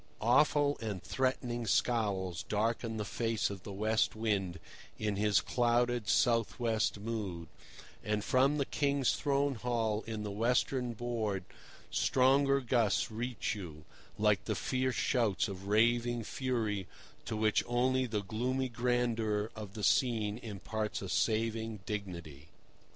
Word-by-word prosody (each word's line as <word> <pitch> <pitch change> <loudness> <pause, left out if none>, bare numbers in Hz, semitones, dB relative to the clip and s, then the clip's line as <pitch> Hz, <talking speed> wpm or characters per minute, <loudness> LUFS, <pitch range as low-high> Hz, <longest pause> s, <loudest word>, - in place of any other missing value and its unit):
Awful 145 +4 +3
and 105 -5 -4
threatening 125 -3 -1
scowls 100 -6 +1
darken 115 +1 0
the 105 - -2
face 115 -1 -1
of 100 -2 -7
the 100 - -8
West 110 +3 +1
Wind 100 -5 -1 0.4
in 105 -2 -1
his 105 -1 +3
clouded, 120 -2 +1
south 115 +3 +2
west 110 -3 0
mood; 100 -6 -4 0.6
and 105 0 -1
from 135 +3 +3
the 140 - +1
King's 140 -2 +1
throne 140 -1 +1
hall 115 -3 -1
in 110 -2 -4
the 105 - -4
western 125 +3 +1
board 110 -5 -2 0.5
stronger 135 +1 +3
gusts 115 -3 +1
reach 120 +2 -2
you, 80 -7 -8 0.3
like - - +2
the - - -1
fierce 130 0 -1
shouts 115 -6 +1
of 100 -1 -7
raving 120 +2 +2
fury 110 -6 -2 0.4
to 110 - -3
which 110 0 +2
only 130 +2 +2
the 105 -3 -2
gloomy 125 +6 -1
grandeur 115 -3 0
of 105 -2 -8
the 105 - -5
scene 110 -4 +2
imparts 110 -1 -4
a 95 - -5
saving 110 +1 0
dignity. 85 -8 -6
115 Hz, 135 wpm, -33 LUFS, 105-125 Hz, 0.6 s, Awful